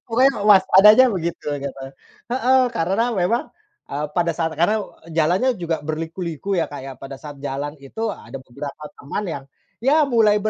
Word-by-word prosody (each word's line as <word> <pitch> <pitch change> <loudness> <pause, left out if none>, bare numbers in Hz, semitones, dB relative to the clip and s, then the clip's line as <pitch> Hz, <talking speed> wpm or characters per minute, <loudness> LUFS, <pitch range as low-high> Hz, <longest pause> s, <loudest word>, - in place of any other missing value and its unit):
Pokoknya 255 +4 +4
waspada 195 -1 +7
aja 260 - +8
begitu, 170 -2 -4 0.2
gitu. 135 -1 -6 0.5
Heeh, 260 +1 +3
karena 195 +9 0
memang, 205 +5 +1 0.5
eee, 150 +2 -2
pada 170 -1 +2
saat 165 -1 -1
karena, 210 +6 +2 0.3
jalannya 170 +9 +2
juga 170 -1 -1
berliku-liku 165 +4 -3
ya, 165 - +1
Kak, 145 - -7
ya. 135 - -6
Pada 135 0 -8
saat 145 -2 -9
jalan 145 +1 -4
itu, 220 +12 -4
ada 135 - -10
beberapa 140 +4 -8 0.2
teman 175 +9 -4
yang, 140 -5 -5 0.4
ya 300 +3 +5
mulai 220 -4 +4
170 Hz, 160 wpm, -21 LUFS, 150-215 Hz, 0.5 s, aja